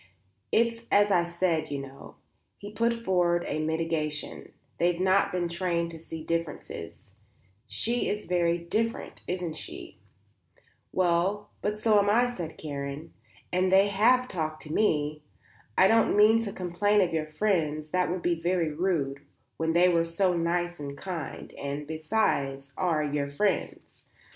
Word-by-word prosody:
"It's 230 0 +1
as 205 0 +5
I 180 - +5
said, 170 -1 0
you 140 - -2
know," 135 0 -10 0.4
he 205 0 -9
put 230 +2 +1
forward 175 -2 +2
a - - -2
mitigation; 155 -1 -2 0.3
"they've 175 0 +2
not 190 +1 +3
been 180 -1 -1
trained 170 -1 -1
to 165 - -9
see 160 0 -8
differences; 165 - -5 0.5
she 240 - 0
is 210 +1 -3
very 175 -1 +2
different, 215 +7 -3
isn't 180 -2 -2
she?" - - -9 0.9
"Well, 185 +4 +1
but 210 +1 -1
so 215 -1 +4
am 200 0 +2
I," 245 +3 +3
said 170 -7 -6
Karen, 140 +1 -6 0.4
"and 185 +1 +2
they 195 +1 +5 0.4
talked 155 -6 -4
to 150 - -7
me. 150 -7 +1 0.6
I 190 - +7
don't 225 0 +3
mean 215 +2 +6
to 200 - -4
complain 200 +2 +1
of 175 -3 +1
your 155 -1 -1
friends; 155 -4 0
that 180 -2 +1
would 180 0 -3
be 170 -2 0
very 170 -2 0
rude 150 -5 -1 0.4
when 160 0 0
they 175 +2 +5
were 170 -2 +3
so 175 +2 +1
nice 175 0 -1
and 140 -1 -6
kind; 175 -7 -6
and, 140 +1 -5
besides, 145 -4 -1
are 165 -4 +1
your 145 -1 -1
friends. 195 +9 -2
170 Hz, 150 wpm, -28 LUFS, 155-195 Hz, 0.9 s, I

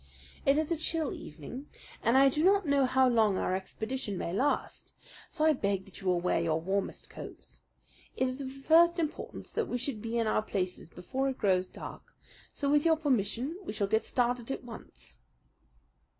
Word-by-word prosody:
It 275 +1 +5
is 315 +1 0
a 335 - +2
chill 320 -1 -1
evening, 170 - -8 0.3
and 235 +3 +3
I 275 +1 +7
do 300 +3 +1
not 395 +1 +4
know 280 -2 +3
how 260 +1 +4
long 220 -5 +3
our 185 - 0
expedition 220 +3 -4
may 170 - -3
last; 265 +9 -1 0.4
so 310 -2 0
I 315 - +6
beg 200 -7 -1
that 195 - -11
you 190 - -5
will 180 -1 +3
wear 175 -1 +1
your 165 -1 +1
warmest 190 +4 -2
coats. - - -9 0.6
It 260 - +2
is 255 +2 -4
of 270 - -4
the 270 +1 -9
first 340 +3 +6
importance 315 -3 -4
that 455 - -1
we 245 - -1
should 245 -3 -3
be 230 +1 -2
in 230 - +2
our 215 - +2
places 185 -5 -3
before 265 +11 -2
it 265 - -4
grows 185 -3 +2
dark; - - -8 0.5
so 285 - -3
with 295 +1 +4
your 325 -1 +4
permission 265 - 0
we 345 - -5
shall 205 -2 0
get 220 +3 +1
started 245 -1 0
at 270 - -3
once." 235 -2 -12
250 Hz, 195 wpm, -30 LUFS, 200-285 Hz, 0.6 s, I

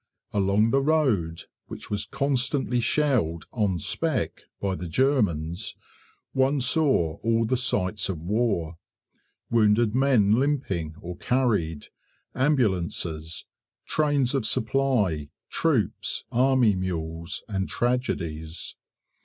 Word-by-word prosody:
Along 100 +3 +2
the 135 - +3
road, 130 - +1 0.2
which - - -9
was 105 0 -1
constantly 135 -2 0
shelled 115 - +1
"on 105 -6 0
spec" - - -1 0.2
by 100 -1 -1
the 90 -1 -5
Germans, 95 - 0 0.6
one 135 +2 +2
saw 125 - +2
all 115 0 +1
the 130 - +1
sights 105 -5 0
of 90 -5 -3
war: 90 -3 -1 0.7
wounded 110 -1 +3
men 125 -5 +4
limping 100 - -1
or 90 0 -7
carried, 110 - 0 0.4
ambulances, 90 - 0 0.4
trains 145 -4 +1
of 135 -4 +1
supply, 110 - +1 0.2
troops, - - 0
army 125 -3 +4
mules, 85 -2 -4
and 95 -3 -2
tragedies. 85 -10 -2
110 Hz, 105 wpm, -26 LUFS, 85-130 Hz, 0.7 s, men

